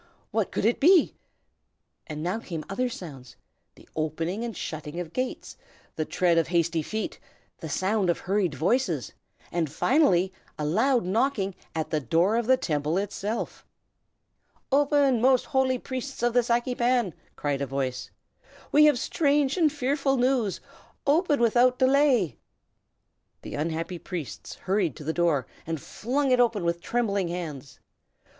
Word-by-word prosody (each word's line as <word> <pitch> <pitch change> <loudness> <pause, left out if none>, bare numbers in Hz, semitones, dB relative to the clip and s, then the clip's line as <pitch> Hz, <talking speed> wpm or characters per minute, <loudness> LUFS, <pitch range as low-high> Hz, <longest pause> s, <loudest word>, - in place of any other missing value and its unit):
what 220 -2 0
could - - -1
it 230 - +2
be? 350 +2 +5 0.9
And 155 -1 -5
now 180 +6 -1
came 165 -8 -6
other 250 +6 -1
sounds, 140 - -9 0.4
the - - -18
opening 165 +7 -2
and 230 -5 -5
shutting 155 +1 -5
of 170 -2 -6
gates, 255 0 -4 0.4
the 155 - -1
tread 170 0 +2
of 165 - 0
hasty 170 -1 +1
feet, 215 +8 -4 0.4
the - - -6
sound 195 0 0
of 170 - +2
hurried 185 -5 0
voices, 240 - 0 0.4
and 165 -4 -1
finally 190 - +3 0.2
a 150 - -2
loud 230 - +2
knocking 205 -1 0 0.2
at 160 -1 -2
the 155 - +1
door 165 - +2
of 235 -1 0
the 260 0 +5
Temple 150 - -1
itself. 205 +2 -3 1.1
"Open, 280 -3 +3
most 255 0 +4
holy 265 -2 +1
Priests 260 0 -6
of 240 -1 +2
the 245 - +5
Saki 240 +1 0
Pan!" 240 -6 +1 0.2
cried 145 -1 -2
a 140 - -1
voice. 130 -1 -3 0.6
"We 300 +1 +7
have 295 -4 +5
strange 285 +1 +1
and 320 -5 +3
fearful 275 -1 0
news! 245 -5 +1 0.5
Open 295 0 +3
without 245 +2 +4
delay!" 260 - +3 1.0
The - - -7
unhappy 165 +3 -3
priests 170 -7 -6
hurried 190 -6 0
to - - -9
the 160 +2 -2
door, 165 -7 +1 0.2
and 165 -1 -2
flung 260 - -1
it 250 - +4
open 230 -6 +2
with 170 0 0
trembling 200 -6 0
hands. 150 -7 -6
205 Hz, 150 wpm, -26 LUFS, 165-255 Hz, 1.1 s, We